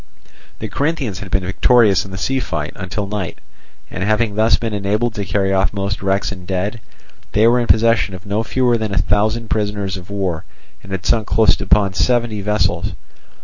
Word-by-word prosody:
The 110 Hz, -, -5 dB
Corinthians 140 Hz, -, -2 dB
had 100 Hz, -, -8 dB
been 95 Hz, 0 st, 0 dB
victorious 105 Hz, +1 st, +3 dB
in -, -, -10 dB
the 95 Hz, -, -7 dB
sea 130 Hz, +8 st, 0 dB
fight 80 Hz, -10 st, -3 dB
until 95 Hz, +3 st, -4 dB
night; 100 Hz, -3 st, -4 dB, 0.5 s
and 95 Hz, -, -3 dB
having 110 Hz, +1 st, +1 dB
thus 110 Hz, +2 st, +3 dB
been 115 Hz, -2 st, -3 dB
enabled 105 Hz, +3 st, 0 dB
to 100 Hz, -2 st, -4 dB
carry 95 Hz, 0 st, 0 dB
off 95 Hz, +1 st, +1 dB
most 100 Hz, -2 st, -3 dB
wrecks 95 Hz, +1 st, 0 dB
and 90 Hz, -3 st, -9 dB
dead, 95 Hz, +5 st, -2 dB, 0.5 s
they 105 Hz, +2 st, +4 dB
were 120 Hz, +2 st, +5 dB
in 120 Hz, -, -1 dB
possession 115 Hz, -3 st, +3 dB
of 95 Hz, +2 st, -11 dB
no 100 Hz, +2 st, -1 dB
fewer 120 Hz, 0 st, +1 dB
than 110 Hz, -2 st, -2 dB
a -, -, -3 dB
thousand 110 Hz, +3 st, +1 dB
prisoners 100 Hz, -2 st, -1 dB
of 90 Hz, +1 st, -11 dB
war, 95 Hz, -5 st, -2 dB, 0.4 s
and 95 Hz, -, -13 dB
had 95 Hz, -1 st, -4 dB
sunk 110 Hz, -3 st, +1 dB
close 110 Hz, -1 st, +3 dB
upon 100 Hz, -2 st, +2 dB
seventy 120 Hz, -1 st, +1 dB
vessels. 105 Hz, +1 st, 0 dB
105 Hz, 190 wpm, -18 LUFS, 95-115 Hz, 0.5 s, were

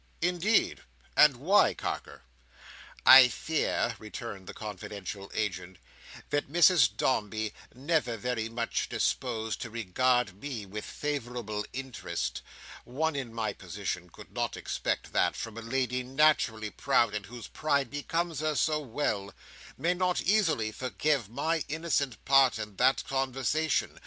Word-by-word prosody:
"Indeed! 180 Hz, +5 st, +2 dB, 0.3 s
And 150 Hz, -3 st, +7 dB
why, 185 Hz, +11 st, +4 dB
Carker?" -, -, -5 dB, 0.8 s
"I 130 Hz, -1 st, +11 dB
fear," 125 Hz, -1 st, -1 dB
returned 105 Hz, -3 st, -8 dB
the -, -, -7 dB
confidential 100 Hz, -1 st, -7 dB
agent, 95 Hz, -4 st, -3 dB, 0.5 s
"that 145 Hz, -1 st, -1 dB
Mrs 160 Hz, -, +5 dB
Dombey, 110 Hz, -3 st, 0 dB, 0.2 s
never 135 Hz, -3 st, 0 dB
very 115 Hz, 0 st, -2 dB
much 115 Hz, 0 st, -2 dB
disposed 110 Hz, -4 st, -1 dB
to 115 Hz, -, -5 dB
regard 115 Hz, -1 st, 0 dB
me 125 Hz, -8 st, -5 dB
with 105 Hz, +2 st, -6 dB
favourable 120 Hz, -7 st, -4 dB
interest—one 135 Hz, +2 st, -4 dB
in 130 Hz, -4 st, -4 dB
my 110 Hz, -3 st, -2 dB
position 90 Hz, -1 st, -5 dB
could -, -, -14 dB
not -, -, -2 dB
expect -, -, -3 dB
that, -, -, +2 dB
from 115 Hz, -2 st, -6 dB
a 115 Hz, -, -6 dB
lady 125 Hz, +1 st, -1 dB
naturally 125 Hz, -5 st, +2 dB
proud, 115 Hz, -3 st, +2 dB
and 105 Hz, -2 st, -4 dB
whose 120 Hz, 0 st, -9 dB
pride 140 Hz, -5 st, 0 dB
becomes 165 Hz, +2 st, -2 dB
her 155 Hz, 0 st, 0 dB
so 155 Hz, +2 st, +2 dB
well—may 135 Hz, -, -3 dB
not 180 Hz, 0 st, 0 dB
easily 165 Hz, -, +2 dB
forgive 130 Hz, +1 st, -1 dB
my 160 Hz, +6 st, -1 dB
innocent 145 Hz, -5 st, -1 dB
part 135 Hz, -2 st, +5 dB
in 105 Hz, -2 st, -6 dB
that 135 Hz, -, +3 dB
conversation. 135 Hz, +4 st, 0 dB
125 Hz, 125 wpm, -29 LUFS, 110-150 Hz, 0.8 s, I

